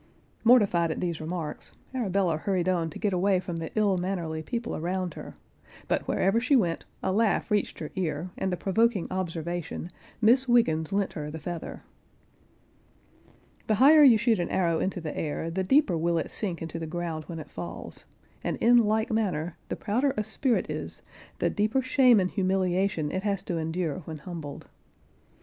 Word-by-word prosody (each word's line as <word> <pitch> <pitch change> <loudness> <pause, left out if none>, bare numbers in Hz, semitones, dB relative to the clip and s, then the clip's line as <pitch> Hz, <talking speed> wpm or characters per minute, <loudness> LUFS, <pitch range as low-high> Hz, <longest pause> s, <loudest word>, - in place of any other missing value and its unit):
Mortified 205 -8 +5
at 160 - -3
these 170 -3 -2
remarks, 160 -1 -5 0.2
Arabella 195 -8 +1
hurried 185 +1 -1
on 170 -3 +1
to - - -9
get 205 -2 0
away 185 +1 +2
from 175 -2 -5
the 165 -1 -4
ill 205 -4 +2
mannerly 175 -4 -3
people 235 +8 -4
around 180 +1 -2
her; - - -9 0.5
but - - -1
wherever 195 +5 +2
she 250 +4 +2
went, 175 -9 +1 0.2
a - - +1
laugh 215 +2 +1
reached 210 -1 0
her 155 - -6
ear, 170 -1 -2
and 190 - -2
the 180 - -1
provoking 215 0 +1
observation, 175 -1 -4 0.3
"Miss 245 +4 +4
Wiggens 160 -11 +3
lent 200 -1 0
her 150 -2 -5
the 155 - -6
feather." 165 +2 -6 1.8
The 215 - +3
higher 290 +7 +7
you 260 -6 +8
shoot 225 -2 +2
an 175 - -1
arrow 170 -3 +1
into 190 -1 -1
the 155 -2 -5
air, 160 +2 -3
the 190 +3 -1
deeper 265 - +3
will 170 +1 +1
it 160 - -2
sink 180 -6 -4
into 165 0 -5
the 165 - -4
ground 165 -2 -4
when 170 - -7
it 155 -2 -9
falls, 85 -1 -7 0.4
and - - -2
in 240 +1 +5
like 220 0 +2
manner 180 -7 -1
the - - -2
prouder 255 +6 0
a 215 - +1
spirit 235 +3 0
is, - - -6 0.3
the - - +1
deeper 215 +5 +1
shame 255 -3 +5
and 185 -1 0
humiliation 185 -4 0
it 185 - -2
has 200 -1 -1
to - - -4
en[Pg 160 0 -2
50]dure 175 -2 -2
when 160 -1 -5
humbled. 150 -2 -8
185 Hz, 180 wpm, -27 LUFS, 165-215 Hz, 1.8 s, you